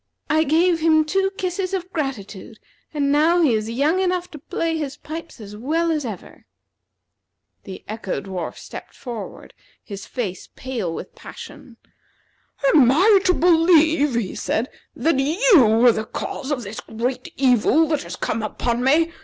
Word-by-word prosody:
I 315 +1 +3
gave 330 +3 +3
him 315 -1 +3
two 385 +4 +1
kisses 370 +1 -2
of 370 0 -5
gratitude, 225 - -5 0.3
and 285 -2 0
now 330 +4 +3
he 275 -7 +3
is 215 0 -1
young 290 +10 +1
enough 360 -1 -1
to 300 - -9
play 325 +3 -2
his 290 -4 -4
pipes 325 -2 -8
as 210 -1 -10
well 320 +9 0
as 305 -4 -1
ever." 215 -6 -9 1.2
The 190 -2 -9
Echo 215 -3 -4
dwarf 185 -3 -6
stepped - - -10
forward, 235 -5 -8 0.3
his 200 -3 -9
face 200 -8 -5
pale 240 -10 -4
with - - -7
passion. 235 -3 -12 1.0
"Am 270 -6 +6
I 390 +8 +5
to 365 - +4
believe," 325 -4 +4
he 225 -6 -2
said, 230 +4 -2 0.2
"that 275 +2 +1
you 275 - +4
are 245 - +8
the 220 -1 -3
cause 265 +4 -5
of 275 -5 -2
this 205 +1 -7
great 245 +3 -4
evil 270 +5 +3
that 305 -3 0
has - - -7
come 225 - -2
upon 235 +3 -2
me? 320 +5 +3
280 Hz, 160 wpm, -21 LUFS, 230-330 Hz, 1.2 s, are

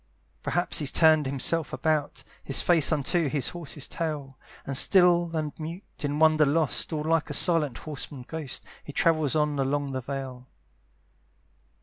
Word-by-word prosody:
Perhaps 175 +1 -1
he's 145 -3 -2
turned 155 -3 +4
himself 140 +3 +1
about, 155 -2 -1 0.2
His 135 - 0
face 165 -5 +3
unto 155 +1 +1
his 145 -1 -1
horse's 155 -5 -6
tail, 150 -5 -4 0.3
And 140 - -4
still 175 +2 +4
and 155 -2 -3
mute, 165 +5 -6 0.2
in 145 0 -2
wonder 155 0 +4
lost, 150 +3 0
All 155 -2 -2
like 160 0 0
a - - 0
silent 155 -8 +3
horseman 145 -3 -6
ghost, 155 -5 -5 0.2
He 145 - -10
travels 155 -4 +1
on 150 -2 0
along 140 +1 -1
the 130 -1 -3
vale. 130 -1 -6
150 Hz, 150 wpm, -26 LUFS, 140-160 Hz, 0.3 s, turned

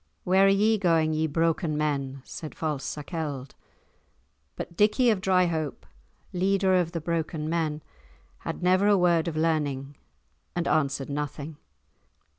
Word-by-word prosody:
"Where 190 +2 +4
are - - +6
ye 210 +2 +3
going, 165 -4 +2
ye 155 +1 +1
broken 165 0 0
men?" 140 -3 -2
said 155 - -8
false 150 -4 -2
Sakelde. 145 -3 -5 1.0
But 170 - -7
Dickie 220 +5 +4
of 200 -4 -1
Dryhope, 175 -5 +1 0.5
leader 190 +1 +2
of 175 -2 +1
the 165 - -1
broken 160 -1 -2
men, 155 -2 -1 0.6
had - - -5
never 185 +3 +4
a 205 -1 +5
word 175 -2 +3
of 160 -2 -3
learning, 145 -4 -1 0.6
and 175 -1 -1
answered 140 -2 0
nothing. 145 +1 -4
165 Hz, 135 wpm, -27 LUFS, 150-180 Hz, 1.0 s, are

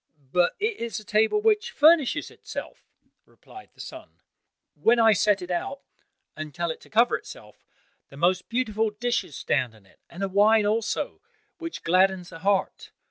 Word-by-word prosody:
"But 175 +1 +2
it 435 +1 -1
is 235 -1 -4
a - - -13
table 220 - +2
which 435 -1 +2
furnishes 310 -3 +3
itself," - - -9 0.4
replied 380 - -15
the - - -25
son. - - -9 0.6
"When 235 +2 +3
I 225 -1 +6
set 205 -1 +2
it 180 - -6
out, 270 +11 -3 0.5
and 155 -2 -7
tell 170 -1 -1
it - - -9
to - - -17
cover 235 +3 +3
itself, - - -14 0.5
the 140 - -14
most 180 +3 +1
beautiful 225 -3 0
dishes 215 - -2
stand 120 -3 -1
on 105 -3 -21
it, - - -25
and 180 +3 -7
a - - +1
wine 210 +2 +4
also, 225 - -1 0.4
which 330 0 -7
gladdens 185 +1 +2
the 165 - -11
heart. 195 +2 0
210 Hz, 170 wpm, -25 LUFS, 180-240 Hz, 0.6 s, I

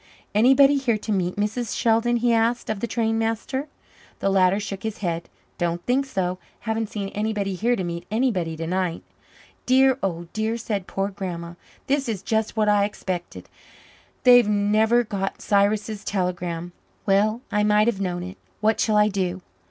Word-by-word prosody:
"Anybody 270 +6 +5
here 245 -5 +1
to 215 - -5
meet 180 -3 0
Mrs. 215 +3 -2
Sheldon?" 230 +1 +2
he 235 0 +2
asked 230 +1 +1
of 215 - -3
the 235 - -2
station 225 0 0
master. 225 +5 -2 0.5
The 195 - 0
latter 190 0 +3
shook 200 -2 -5
his 220 -1 -4
head. 170 -3 -3 0.3
"Don't 175 0 -1
think 270 +3 +1
so. 185 -6 -2 0.2
Haven't 220 -1 -2
seen 200 -2 -4
anybody 210 -2 -2
here 235 +7 +1
to 190 - -3
meet 170 -1 -5
anybody 205 -8 0
tonight." 170 +1 -2 0.6
"Dear, 265 +1 +4
oh 175 -3 -2
dear," 220 +2 -1
said 210 -5 -3
poor 195 +1 -2
Grandma. 175 -4 -6 0.3
"This 275 -2 0
is 200 -4 -3
just 220 0 -1
what 215 -1 +2
I 205 -1 +4
expected. 185 -4 -5 0.8
They've 245 -3 +7
never 215 +3 +3
got 195 -3 -3
Cyrus's 205 0 +1
telegram. 175 -3 -2 0.3
Well, 210 +4 +2
I 210 - +2
might 210 0 +4
have 220 -4 0
known 175 -2 -2
it. 185 +2 -8 0.2
What 220 +1 +2
shall 215 -2 +2
I 210 0 +5
do?" 185 -3 -2
210 Hz, 165 wpm, -24 LUFS, 185-225 Hz, 0.8 s, They've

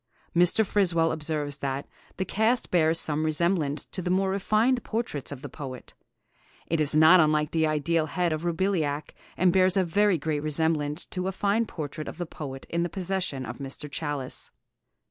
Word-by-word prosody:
Mr. 180 +6 +5
Friswell 175 -5 +2
observes 150 -2 -3
that 135 0 -3 0.3
'the 190 - -1
cast 220 +6 +1
bears 165 -2 +3
some 155 0 +1
resemblance 155 -2 0
to 185 - -5
the 180 - -3
more 190 +1 +2
refined 215 +6 +2
portraits 220 - -3
of 140 -1 -8
the - - -4
poet. 130 -3 -8 0.7
It 165 - -1
is 150 0 +1
not 160 +4 +8
unlike 150 -1 +3
the 160 -1 +2
ideal 155 +1 +1
head 175 +1 0
of 155 +1 -4
Roubillac, 165 -4 -1 0.2
and 180 -1 +4
bears 185 0 +4
a 190 - +4
very 200 +2 +2
great 150 0 -2
resemblance 155 0 -1
to 180 0 -4
a - - 0
fine 205 +4 +1
portrait 155 -2 -6
of - - -7
the 175 - -3
poet 135 -4 -8
in 170 - -1
the 175 - -1
possession 180 -7 -2
of - - -7
Mr. 140 +2 -6
Challis. 145 -3 -4
165 Hz, 180 wpm, -27 LUFS, 150-185 Hz, 0.7 s, not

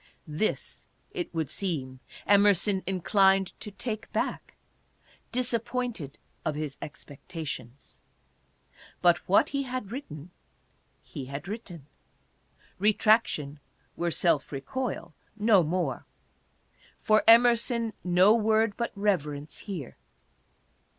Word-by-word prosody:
This, 155 +7 -3 0.2
it 370 -5 -4
would 160 -4 -2
seem, 135 -9 -3 0.3
Emerson 200 -1 +4
inclined 190 0 +3
to - - -7
take 215 +1 -5
oack, - - -2 0.8
disappointed 240 - -2 0.3
of 155 - -1
his 150 -2 -4
expectations. 140 -3 -8 1.0
But 175 -1 +5
what 200 - +5
he 280 0 -1
had 255 -6 -5
written 175 - -8 0.7
he 135 - -7
had 140 +6 -7
written. 195 - -7 0.9
Retraction 210 -8 +2 0.4
were 170 0 -1
self 165 -3 +1
re 135 -2 -4
coil, 245 - -4 0.2
no 210 -3 +5
more. 165 -4 -2 0.9
For 215 0 +3
Emerson 235 0 +5
no 180 +4 +5
word 220 -1 +2
but 235 - -2
reverence 150 -8 -1
here. 175 - -7
195 Hz, 100 wpm, -28 LUFS, 155-225 Hz, 1.0 s, But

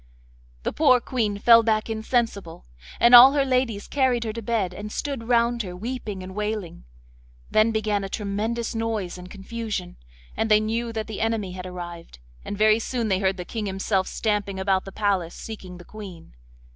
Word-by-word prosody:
The - - -2
poor 270 -5 +5
Queen 225 -5 -2
fell 230 +2 +7
back 215 -1 0
insensible, 220 - -2 0.3
and 240 +1 +5
all 250 +3 +11
her 280 -2 +2
ladies 255 -5 0
carried 260 -4 +1
her 220 -2 -3
to 230 - -5
bed, 205 -5 -1
and 210 +3 -7
stood 270 -4 -4
round 235 0 +2
her 180 -4 -6
weeping 215 -2 -5
and 185 0 -8
wailing. 210 - -4 0.7
Then 215 +1 +4
began 215 -2 0
a 195 - -5
tremendous 215 +4 -3
noise 220 -6 -3
and 180 0 -10
confusion, 210 - -5 0.4
and 225 - -1
they 215 0 +6
knew 230 +2 -2
that 220 -1 -3
the 220 - -6
enemy 220 -4 -1
had 185 0 -7
arrived, 175 - -8 0.3
and 205 - -5
very 215 +1 +4
soon 230 -1 -2
they 190 -1 +2
heard 190 -1 0
the 180 - -6
King 215 +2 -4
himself 195 0 -1
stamping 205 -3 -2
about 190 -1 +1
the 195 - -8
palace 190 -5 -1
seeking 190 -5 -8
the 175 - -13
Queen. 190 - -11
215 Hz, 185 wpm, -24 LUFS, 190-230 Hz, 0.7 s, all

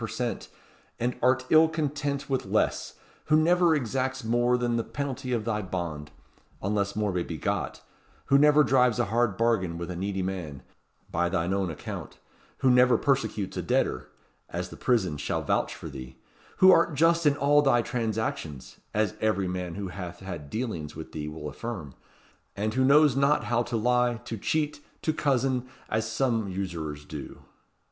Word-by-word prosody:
per - - -2
cent., - - -3 0.5
and 125 +2 0
art 130 +1 +3
ill 160 +1 +7
content 145 -2 -2
with 135 -2 0
less; - - 0 0.3
who 155 - +4
never 170 +1 +4
exacts 130 0 -2
more 120 +2 +2
than 120 -1 0
the 115 - 0
penalty 135 -2 -4
of 115 -3 -1
thy 105 -2 -1
bond, 85 -6 -4 0.5
unless 100 0 -1
more 105 -2 0
may 90 - 0
be 85 -1 -5
got; - - -2 0.4
who 140 - +5
never 150 +1 +6
drives 125 -4 +3
a 120 - +2
hard 120 -5 +2
bargain 105 -8 +1
with 85 +1 -5
a - - -5
needy 95 +1 -2
man 85 -8 -5 0.5
by 85 +1 +1
thine 90 0 0
own 95 -2 0
account; 80 - -7 0.4
who 130 - +5
never 125 0 +5
persecutes 135 -8 0
a - - -2
debtor 65 0 0 0.4
as - - -4
the - - -10
prisons 95 - 0
shall - - -2
vouch - - 0
for - - -8
thee; 65 -1 -9 0.4
who 185 0 +8
art 165 -3 +4
just 165 +2 +4
in 145 0 +3
all 145 +1 +4
thy 120 -4 +3
transactions 110 - -3 0.2
as 105 -2 +1
every 100 -3 +1
man 90 -1 -4
who 100 -2 -4
hath 90 -1 -7
had 85 -7 -7
dealings 105 - -4
with 80 0 -8
thee 75 -1 -5
will 75 0 -6
affirm; 80 - -6 0.6
and 110 +2 -1
who 130 +2 +2
knows 145 0 +5
not 140 +2 +3
how 120 0 +1
to 120 -1 -2
lie, 125 +1 +2
to 115 - -4
cheat, 150 +8 -1 0.2
to 155 - +1
cozen 130 -3 0 0.2
as 110 0 -1
some 115 -3 0
usurers 85 -6 -4
do." - - -8
115 Hz, 175 wpm, -27 LUFS, 90-130 Hz, 0.6 s, who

